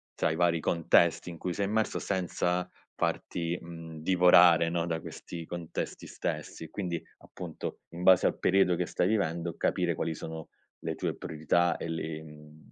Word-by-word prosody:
tra - - +1
i 80 - -1
vari 85 -1 +2
contesti 85 +2 +3
in 85 - -9
cui 90 - -2
sei 100 +3 -1
immerso 110 +2 0
senza 90 -1 -1 0.3
farti, 85 0 -1
mhmm, 80 -2 -9
divorare, 90 -2 +6
no, 85 0 0
da 80 -1 -2
questi 85 +2 -8
contesti 85 -2 -5
stessi, 80 - -5
quindi, 85 -1 -3 0.2
appunto, - - -7
in 85 +1 -7
base 95 0 +6
al - - -1
periodo 95 -1 +3
che 90 - -1
stai 90 - 0
vivendo 85 -5 -1
capire 85 -2 +1
quali 80 - -2
sono 80 0 -7 0.3
le - - -2
tue - - -2
priorità 80 +3 +1
e - - -5
li 80 -1 -4
mhmm, 75 0 -15
85 Hz, 165 wpm, -30 LUFS, 80-90 Hz, 0.3 s, divorare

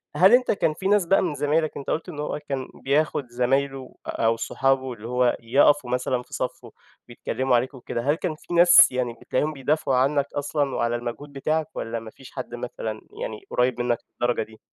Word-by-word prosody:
هل 190 +5 +6
أنت 250 0 +5
كان 160 -6 +1
في 190 +5 -3
ناس 205 -2 +3
بقى 195 +3 +4
من 170 -5 -1
زمايلك، 150 +2 0
أنت 140 - -6
قُلت 160 +3 -2
إن 150 -4 -8
هو 150 0 -3
كان 130 -2 -2 0.2
بياخُد 145 -1 +1
زمايله 135 +2 -1
أو 115 0 +1
صحابه 130 +1 0
اللي 115 -1 -9
هو 125 0 +2
يقفوا 135 +3 +3
مثلًا 125 0 0
في - - -19
صَفُّه - - -4 0.4
بيتكلّموا 125 +1 -1
عليك 125 +4 0
وكده، 120 -2 -5
هل 145 +5 +2
كان 165 -1 -3
في 165 - -9
ناس 175 0 +8
يعني 125 -2 -1
بتلاقيهم 150 +4 -1
بيدافعوا 140 -1 0
عنّك 140 +2 +2
أصلًا 145 -1 -1
وعلى 120 0 0
المجهود 120 +5 -6
بتاعك 155 +3 -1
والّا 115 0 -3
ما 110 -1 -10
فيش 135 - -15
حد 120 - -6
مثلًا 115 -3 -5 0.2
يعني 110 -1 -5
قُريّب 125 0 +1
منّك 120 -1 +1 0.2
للدرجة 120 -1 +1
دي؟ 110 0 -16
135 Hz, 195 wpm, -24 LUFS, 120-150 Hz, 0.4 s, ناس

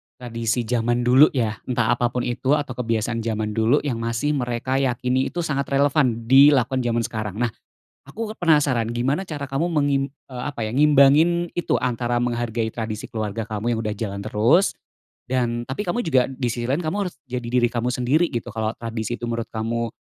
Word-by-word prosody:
tradisi 115 -1 -2
zaman 120 +1 0
dulu 130 +5 +7
ya. 110 -4 -1
Entah 120 -2 +1
apa 120 0 +1
pun 125 +1 -3
itu 130 +3 +1
atau 145 -3 -3
kebiasaan 115 -1 -1
zaman 110 -1 -2
dulu 110 +6 +2
yang 125 -6 -2
masih 115 +5 -1
mereka 125 0 -1
yakini 130 0 0
itu 175 - -3
sangat 140 -3 -1
relevan 140 -4 +2
dilakukan 135 -1 +5
zaman 120 -2 0
sekarang. 110 -4 -4
Nah 120 - 0 0.6
aku 215 +9 -5
kan - - -38
penasaran, 140 -8 +3
gimana 130 +9 0
cara 150 -6 -5
kamu 140 +5 0
mengim 145 -3 +2 0.3
eee, 125 -1 -6
apa 115 -6 -4
ya, - - -4
ngimbangin 150 +4 +5
itu, 175 - 0
antara 120 -1 -1
menghargai 120 -2 -1
tradisi 110 -2 -4
keluarga 110 0 -4
kamu 110 +1 -2
yang - - -3
udah 105 - -2
jalan 100 -2 -4
terus, 110 - +2 0.6
dan 120 -2 0
tapi 140 +11 -4
kamu 235 +8 0
juga 130 -6 +3
disisi 120 -3 -3
lain 140 +7 0
kamu 160 +3 -2
harus 180 - -7
jadi 125 -2 -5
diri 120 0 +2
kamu 120 0 -2
sendiri 135 +8 +2
gitu. 120 0 -3
Kalau 110 0 -2
tradisi 115 0 -4
itu 120 - -8
menurut 115 -1 -2
kamu 115 +1 -2
120 Hz, 185 wpm, -23 LUFS, 115-140 Hz, 0.6 s, dulu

